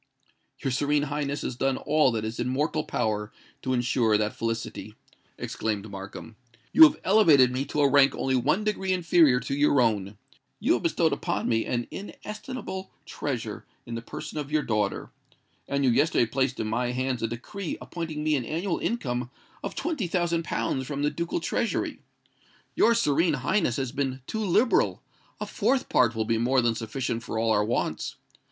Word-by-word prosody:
"Your 135 - 0
Serene 145 +3 +1
Highness 145 0 -2
has 130 - -3
done 135 +1 0
all 150 -3 +3
that 110 -1 -2
is 110 +2 -5
in 125 - -1
mortal 145 +4 0
power 105 -1 -2 0.3
to 130 - -2
ensure 120 -3 +2
that 105 0 -1
felicity," 115 0 -4 0.4
exclaimed 105 -1 -3
Markham. 100 +3 -9 0.4
"You 320 - +11
have 300 - +2
elevated 160 -11 +6
me 130 +2 -2
to 150 - -1
a 140 - +6
rank 140 0 +5
only 130 0 0
one 150 - +1
degree 195 -3 0
inferior 165 -7 +4
to 130 +3 -4
your 145 0 +3
own;—you 105 -4 -1
have - - 0
bestowed - - +2
upon - - -2
me 115 -1 +1
an 120 -1 -1
inestimable 210 -1 -7 0.2
treasure 125 -9 -4 0.2
in 115 - -7
the 115 - -3
person 150 - -6
of 145 0 -5
your 155 -1 +2
daughter;—and 110 +5 -4
you 125 - +4
yesterday 140 0 +3
placed 130 +2 -1
in 110 - -1
my 120 +3 -1
hands 130 -1 -1
a 115 - +1
decree 160 - -5
appointing 160 -3 -5
me 155 0 +2
an 130 - -1
annual 165 - -2
income 125 - -2 0.3
of - - -4
twenty 305 - -2
thousand 170 -1 0
pounds 130 -5 -2
from 145 -1 -3
the 150 - +2
ducal 170 0 -2
treasury. 230 +7 -1 0.7
Your 230 +1 +4
Serene 160 -5 +2
Highness 140 - +1
has 130 -2 -2
been 135 -2 -2
too 220 +7 -3
liberal:—a 215 +5 0
fourth 265 -1 0
part 120 -3 +3
will 110 -1 0
be 115 0 +1
more 130 +3 +3
than 120 -2 +2
sufficient 115 +1 -3
for 115 -1 -5
all 115 0 +1
our 105 -1 +3
wants. 110 +3 -2
135 Hz, 175 wpm, -27 LUFS, 115-165 Hz, 0.7 s, You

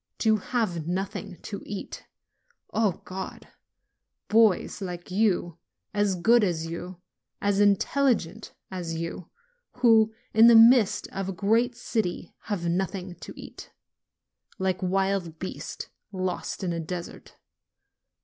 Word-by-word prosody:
To 220 -1 +3
have 185 -8 -2
nothing 190 +1 -3
to 200 - -6
eat! 200 -1 -7 0.7
O 205 -5 0
God! 190 +1 -7 0.8
Boys 215 -2 +3
like 180 -2 -6
you, 180 -4 +1 0.3
as 205 -2 +1
good 225 +6 +4
as 170 -4 0
you, 170 +2 -7 0.4
as 200 -1 +1
intelligent 210 -1 +2 0.2
as 175 -3 -4
you, 165 +1 -5 0.4
who, 225 -3 +5 0.2
in 225 +2 +8
the 235 - +8
midst 225 -3 +6
of 195 -1 -4
a - - -3
great 225 +6 +2
city, 215 -8 -2
have 195 -6 -2
nothing 185 +1 -2
to - - -9
eat, - - -10 0.9
like 185 -1 -1
wild 190 -3 0
beasts 185 - -6 0.2
lost 185 0 -3
in 175 -2 -1
a 165 - -3
desert! 170 +1 -7
195 Hz, 120 wpm, -27 LUFS, 175-220 Hz, 0.9 s, in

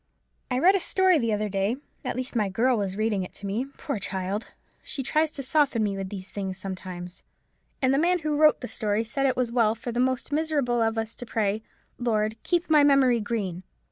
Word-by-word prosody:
I 250 - 0
read 360 +9 +6
a 390 - +2
story 370 -1 +3
the 230 -3 0
other 210 0 0
day—at 210 +7 -3
least 255 0 -4
my 210 -4 +1
girl 245 +6 +2
was 195 -3 -2
reading 215 -2 +1
it 180 - -6
to 200 - -8
me; 210 +6 -1
poor 275 -3 -5
child! 195 +2 -3 0.3
she 270 - -4
tries 310 +4 +2
to 280 -2 -4
soften 270 -4 +2
me 200 -2 0
with 195 -1 -4
these 195 -2 -7
things 190 -2 -4
sometimes—and 185 +7 -5
the 275 - +3
man 355 +3 +3
who 300 -1 +1
wrote 305 0 +5
the 250 - -4
story 215 -1 -1
said 270 +5 0
it 260 - 0
was 250 -2 0
well 230 -2 +3
for 235 +2 -5
the 240 - -2
most 260 +2 0
miserable 290 -6 +1
of 225 0 +1
us 225 0 -3
to 245 - -4
pray, 215 -1 0 0.4
'Lord, 220 -3 0
keep 350 -1 0
my 305 -2 +5
memory 270 -4 +5
green!' 205 -5 -3
230 Hz, 210 wpm, -26 LUFS, 205-275 Hz, 0.4 s, read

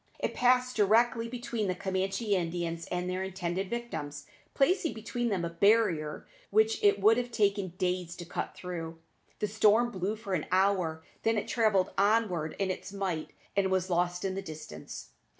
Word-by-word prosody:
It - - -2
passed 250 0 +3
directly 230 +3 +3
between 240 -3 -3
the 185 - 0
Camanchee 195 +3 -2
Indians 170 -2 -2
and 180 0 -2
their 185 +1 -2
intended 190 0 -3
victims, 150 -12 -5 0.3
placing 325 +4 +2
between 235 +2 -2
them 185 -5 0
a - - -2
barrier 175 -5 +2 0.2
which 435 0 +2
it 410 0 +5
would 225 +2 +5
have 245 0 -1
taken 200 -5 +1
days 180 -2 -1
to 175 - -8
cut 175 - -4
through. 165 -2 -6 0.4
The 210 - -1
storm 220 +3 +4
blew 195 +1 -2
for 215 -3 -6
an 160 -5 -1
hour, 185 -4 +2 0.2
then 225 0 +2
it 205 - -2
travelled 215 -5 +2
onward 200 -7 +2
in 195 -1 0
its 195 - -6
might, 190 -6 -3 0.3
and 195 -1 +2
was 185 0 0
lost 175 +1 0
in 190 - -1
the 195 - -3
distance. 155 - -9
195 Hz, 170 wpm, -30 LUFS, 175-225 Hz, 0.4 s, it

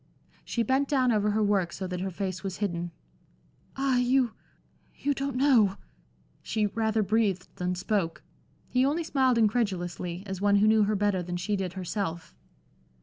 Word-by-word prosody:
She 235 - -1
bent 265 +4 +1
down 260 -4 +3
over 210 -1 +2
her 215 +1 +1
work 195 -4 +1
so 190 - -5
that 180 -1 -4
her 190 - -2
face 185 +1 -4
was 190 -2 -4
hidden. 175 -4 -2 0.9
"Ah, 270 -2 +2
you 250 -1 +2 0.6
you 285 - 0
don't 275 -1 -3
know" 250 -8 +4 0.7
she 215 -1 -1
rather 220 +1 0
breathed 200 -3 +1
than 180 0 -1
spoke. 185 -2 -1 0.4
He 255 0 +2
only 300 +5 +1
smiled 260 -5 +2
incredulously, 190 -6 0
as 190 -1 -5
one 205 0 +4
who 200 +1 +4
knew 215 -1 +5
her 210 +1 0
better 200 -2 +1
than 175 0 -4
she 205 +4 -1
did 190 -2 -3
herself. 180 -2 -4
205 Hz, 165 wpm, -28 LUFS, 185-240 Hz, 0.9 s, knew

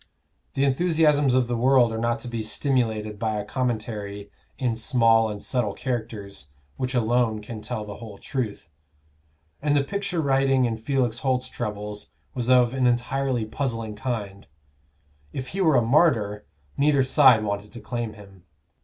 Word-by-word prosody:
The 135 - +1
enthusiasms 150 -2 +3
of 130 -1 +3
the 120 - -1
world 125 -1 +4
are - - -3
not 120 +1 0
to - - -8
be 115 -2 -3
stimulated 110 -3 -1
by 110 -1 -1
a 105 -1 -3
commentary 105 -4 -3 0.3
in 125 -4 0
small 115 0 +3
and 105 -1 -5
subtle 110 -3 -1
characters 110 - -5 0.3
which 130 0 -3
alone 120 -1 +2
can 105 +1 -8
tell 110 0 -4
the 105 -1 -8
whole 105 -3 -10
truth; 115 - -4 0.9
and 145 0 +2
the 140 - +3
picture 200 +2 -2
writing 135 -3 +3
in 115 -2 -1
Felix 120 0 0
Holt's 130 -1 0
troubles 105 0 -5 0.2
was 125 -2 -2
of 125 -1 +5
an 130 -2 +2
entirely 125 0 0
puzzling 115 -3 -3
kind: 105 -4 -4 0.9
if 130 -1 -5
he 195 - -3
were 160 -6 +4
a 120 - +4
martyr, 115 -6 +2 0.3
neither 140 -1 +4
side 130 -4 +6
wanted 100 0 -3
to 120 - -9
claim 120 -2 -4
him. 100 -3 -15
120 Hz, 160 wpm, -25 LUFS, 110-130 Hz, 0.9 s, side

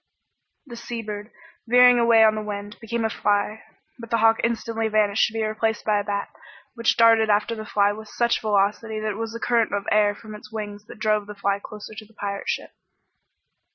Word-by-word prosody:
The 245 -4 -10
sea 235 0 -6
bird, 210 0 -6 0.4
veering 245 +1 +6
away 230 -1 +5
on 215 -1 +5
the 215 - -3
wind, 205 0 -6
became 230 0 -2
a - - +1
fly, 205 +2 0 0.4
but 230 -1 -9
the 230 - +2
hawk 225 0 +4
instantly 230 -1 -1
vanished 215 -1 +2
to 225 - -9
be 225 -1 -1
replaced 220 0 -2
by 210 -1 +2
a - - -2
bat, 200 0 -3 0.5
which 230 -1 0
darted 225 -1 +5
after 210 +2 +2
the 215 -1 -7
fly 205 0 +2
with 215 +1 -8
such 235 +1 0
velocity 215 +1 0
that 215 0 -2
it 200 - -7
was 225 0 -4
the 230 - -6
current 230 -1 +1
of 200 0 -3
air 205 -1 +3
from 215 0 -11
its 210 0 -12
wings 210 -1 -6
that - - -11
drove 215 -1 0
the 210 - -8
fly 200 0 -1
closer 210 0 -9
to 215 - -9
the 225 - -25
pirate 200 -1 -4
ship. - - -3
215 Hz, 215 wpm, -23 LUFS, 205-225 Hz, 0.5 s, veering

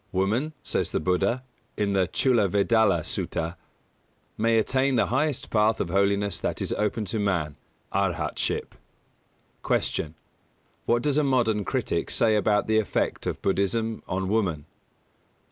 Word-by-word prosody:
"Woman," 110 +11 0
says - - -1
the - - -1
Buddha, 95 +9 0 0.3
in 100 -1 0
the 95 -2 +2
Chullavedalla 105 - +2
Sutta, 80 +1 -3 0.8
"may 115 +1 +2
attain 130 +4 +2
the 115 - +3
highest 145 0 0
path 110 0 +3
of 85 - -2
holiness 100 +1 +1
that - - -2
is - - -1
open 105 +1 -1
to 105 +4 -3
man 85 -8 0 0.4
Arhatship." - - -1 0.9
225. - - +1
Q. 75 - -3 0.8
_What 120 0 +3
does 145 0 +2
a - - +2
modern 120 -6 +2
critic - - -1
say 110 -2 +3
about 105 0 +2
the 110 0 +3
effect 110 - -1
of - - -4
Buddhism 110 +3 0
on 95 0 -2
woman? 95 -8 0
105 Hz, 140 wpm, -26 LUFS, 95-115 Hz, 0.9 s, the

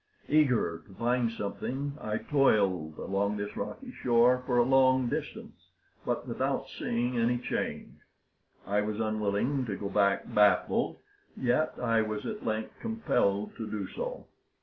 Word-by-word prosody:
Eager 125 - +2
to 95 - -15
find 120 +1 +1
something, 130 +6 -4
I 110 0 -2
toiled 100 - +2
along 100 +2 -1
this 100 0 -5
rocky 260 -2 -5
shore 125 - +3
for 125 -2 +2
a 120 - +6
long 130 -1 +4
distance, - - -6 0.4
but - - -2
without - - -1
seeing 120 +1 -1
any 120 +2 +2
change. 120 - -4 0.7
I 105 +1 +1
was 105 0 -3
unwilling 110 +5 0
to 100 - -2
go 100 0 -4
back 100 -1 +2
baffled, 105 -1 +3 0.4
yet 130 +5 +1
I 115 -2 +2
was 110 -1 -3
at 215 -1 -5
length 110 0 -3
compelled 105 - 0
to 110 -2 -5
do 100 -3 -3
so. - - -5
115 Hz, 145 wpm, -30 LUFS, 105-125 Hz, 0.7 s, a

